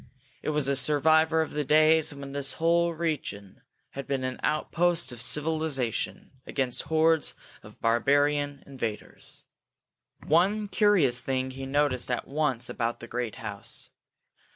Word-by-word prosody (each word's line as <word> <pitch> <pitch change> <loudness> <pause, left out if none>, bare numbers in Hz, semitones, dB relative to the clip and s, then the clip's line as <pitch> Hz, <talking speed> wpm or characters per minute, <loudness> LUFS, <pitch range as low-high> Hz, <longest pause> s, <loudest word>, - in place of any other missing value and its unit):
It - - -3
was 150 -2 0
a 140 - +2
survivor 160 +4 +4
of 160 - -8
the 150 - -1
days 155 +2 +4
when 140 -1 -8
this 140 -1 -1
whole 170 +1 +2
region 150 - -4 0.3
had 140 0 -7
been 135 -2 -1
an 130 0 -3
outpost 170 -1 0
of 120 -2 -4
civilization 150 -3 -1 0.2
against 130 -3 -1
hordes 160 0 +3 0.3
of - - -15
barbarian 145 +4 +1
invaders. 115 -6 -6 0.8
One 195 +7 +2
curious 185 - +3
thing 130 0 -2
he 135 +1 -7
noticed 140 -3 0
at 125 - -2
once 140 -4 -1
about 115 -1 -2
the - - -8
great 120 -2 -3
house. 100 -1 -7
145 Hz, 135 wpm, -27 LUFS, 130-160 Hz, 0.8 s, survivor